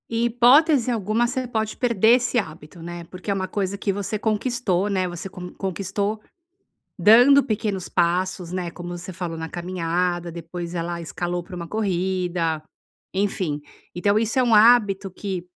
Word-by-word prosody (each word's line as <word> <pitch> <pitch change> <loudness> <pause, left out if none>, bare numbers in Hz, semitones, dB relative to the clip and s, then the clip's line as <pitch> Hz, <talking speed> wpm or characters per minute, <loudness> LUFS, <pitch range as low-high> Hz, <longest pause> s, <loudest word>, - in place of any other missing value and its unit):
Em 230 +1 0
hipótese 250 +3 +4
alguma 225 +1 +1
você 255 0 -3
pode 220 -2 -2
perder 235 -2 +4
esse 245 0 0
hábito, 160 -4 -5
né, 175 +1 -7
porque 185 +4 -6
é - - +3
uma 190 -1 -2
coisa 200 0 -2
que 200 0 -1
você 205 +2 -3
conquistou, 215 -3 0
né, 190 -2 0
você 175 +2 -6
con 180 -1 -9
conquistou 200 +3 -3 0.8
dando 245 +9 +7
pequenos 210 -5 -2
passos, 180 0 0
né, 180 -2 -3
como 175 +1 -8
você 180 +2 -8
falou 170 -2 -5
na 160 0 -4
caminhada, 175 0 -2
depois 170 +1 -7
ela 170 0 -3
escalou 175 +2 -3
para 180 - -10
uma 170 -1 -6
corrida, 180 -5 -1 0.5
enfim. 185 -6 -1 0.3
Então 200 +4 +2
isso 225 +2 -1
é - - +4
um 240 -2 +2
hábito 210 -3 +5
que 185 -2 -5
190 Hz, 160 wpm, -23 LUFS, 175-220 Hz, 0.8 s, dando